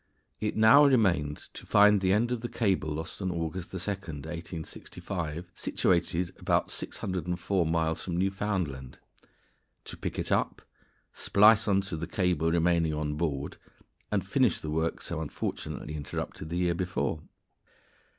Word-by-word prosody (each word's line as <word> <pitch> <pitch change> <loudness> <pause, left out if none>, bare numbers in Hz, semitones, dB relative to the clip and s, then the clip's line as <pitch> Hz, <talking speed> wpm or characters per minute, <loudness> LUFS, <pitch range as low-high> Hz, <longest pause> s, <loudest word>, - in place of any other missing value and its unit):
_ - - -43 0.4
It 105 - -2
now 110 +7 +8
remained 95 - +3 0.2
to - - -9
find 105 -1 +6
the 95 -1 +2
end 115 +5 +2
of 120 -2 -1
the 120 - -4
cable 105 -8 0
lost 80 +5 -5
on 95 - -1
August 85 +1 -3
2, - - -9
1865, 85 -1 -5
situated 90 0 0
about - - +1
604 90 0 -2
miles 80 0 0
from 85 -2 -3
Newfoundland, 95 -9 -2 0.9
to - - -8
pick - - -4
it - - -2
up, - - 0 0.5
splice 105 +2 +5
on 100 -1 +3
to 95 -4 -5
the 85 - -4
cable 90 -4 +1
remaining 85 -2 +2
on 75 -1 -2
board, 75 -3 -2 0.5
and - - 0
finish - - +2
the 75 - -5
work 80 +1 -1
so 85 -2 -3
unfortunately 75 0 -4
interrupted 75 +1 -5
the 85 - -2
year 90 -1 +2
before. 85 -4 -2
85 Hz, 145 wpm, -29 LUFS, 80-95 Hz, 0.9 s, now